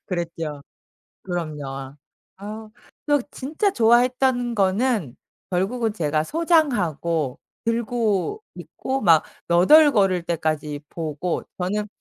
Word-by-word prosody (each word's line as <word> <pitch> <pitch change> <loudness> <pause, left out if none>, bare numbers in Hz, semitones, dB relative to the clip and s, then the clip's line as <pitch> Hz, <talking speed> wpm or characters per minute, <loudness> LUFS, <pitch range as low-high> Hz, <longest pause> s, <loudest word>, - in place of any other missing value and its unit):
그랬죠. 165 -5 -4 0.6
그럼요. 145 -6 -5 0.4
아 215 +2 -8 0.4
그래서 290 -4 +2
진짜 315 +9 -1
좋아했던 245 0 +3
거는 195 - +1 0.3
결국은 215 +5 0
제가 155 -5 0
소장하고 180 - +1 0.3
들고 230 - 0
있고 265 0 -4
막 165 -5 +5 0.2
너덜거릴 195 - +5
때까지 155 -3 -2
보고 160 +1 -3
저는 205 +3 -2
195 Hz, 215 characters per minute, -23 LUFS, 165-245 Hz, 0.6 s, 막